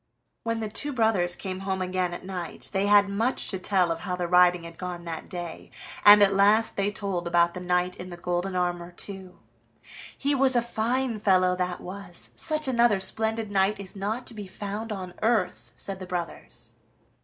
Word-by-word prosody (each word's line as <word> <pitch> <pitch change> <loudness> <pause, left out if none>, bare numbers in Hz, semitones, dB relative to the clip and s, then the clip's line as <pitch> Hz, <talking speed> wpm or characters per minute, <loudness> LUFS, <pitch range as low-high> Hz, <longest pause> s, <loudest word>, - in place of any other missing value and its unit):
When 230 -1 -2
the 220 - -2
two 290 +7 -1
brothers 215 -7 +2
came 185 -1 -5
home 190 -1 -2
again 185 -1 -1
at 175 - -7
night 180 -3 -5
they 195 +1 +1
had 205 -1 +6
much 225 +6 0
to 190 - -1
tell 185 -2 +2
of 165 - -2
how 180 +1 -3
the 180 -1 -2
riding 180 0 +5
had 170 +1 -11
gone 180 -1 -5
off - - -14
that 165 -1 -6
day, 175 -2 -7 0.3
and 205 0 +9
at 200 -1 +4
last 205 +3 +4
they 200 0 +1
told 195 -4 -3
about 170 0 +3
the 180 - -5
knight 180 0 0
in 180 - -8
the 175 - -8
golden 180 +2 -2
armor 175 -1 -1
too. 190 0 -7 0.8
"He 285 +1 +1
was 265 -1 +4
a 240 - +4
fine 235 +1 -1
fellow, 185 -3 +3
that 180 -1 -2
was! 185 -1 -7
Such 305 -2 0
another 235 -5 +3
splendid 220 +2 -1
knight 195 +1 +2
is 195 -1 -8
not 215 +5 -3
to - - -9
be 210 -3 -7
found 205 +4 -5
on 185 -3 -5
earth!" 180 - 0
said 195 -1 -4
the 185 - -7
brothers. 175 -2 -6
190 Hz, 200 wpm, -26 LUFS, 180-215 Hz, 0.8 s, and